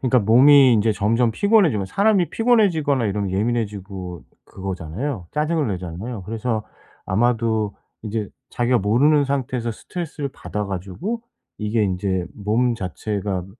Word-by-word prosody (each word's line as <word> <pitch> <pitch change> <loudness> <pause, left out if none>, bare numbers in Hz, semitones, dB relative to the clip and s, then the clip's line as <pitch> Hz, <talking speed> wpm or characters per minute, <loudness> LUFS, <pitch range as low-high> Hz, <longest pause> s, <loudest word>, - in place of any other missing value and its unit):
그러니까 125 -1 +3
몸이 130 +5 +6
인제 110 +1 +2
점점 115 +4 +1
피곤해지면 170 - +3
사람이 200 - +2
피곤해지거나 170 - +2
이러면 100 -1 -2
예민해지고 100 -4 -3 0.2
그거잖아요. 95 - -5
짜증을 150 -2 0
내잖아요. 95 +4 -5
그래서 110 +2 -2 0.4
아마도 110 -1 +1 0.3
이제 110 -1 -3 0.2
자기가 120 0 +1
모르는 140 +9 +3
상태에서 130 -4 -2
스트레스를 150 +3 -5
받아 105 -6 -5
가지고 100 - -4 0.4
이게 105 +1 0
인제 95 -2 -1
몸 115 +4 +1
자체가 95 0 -3
110 Hz, 355 characters per minute, -22 LUFS, 100-140 Hz, 0.4 s, 몸이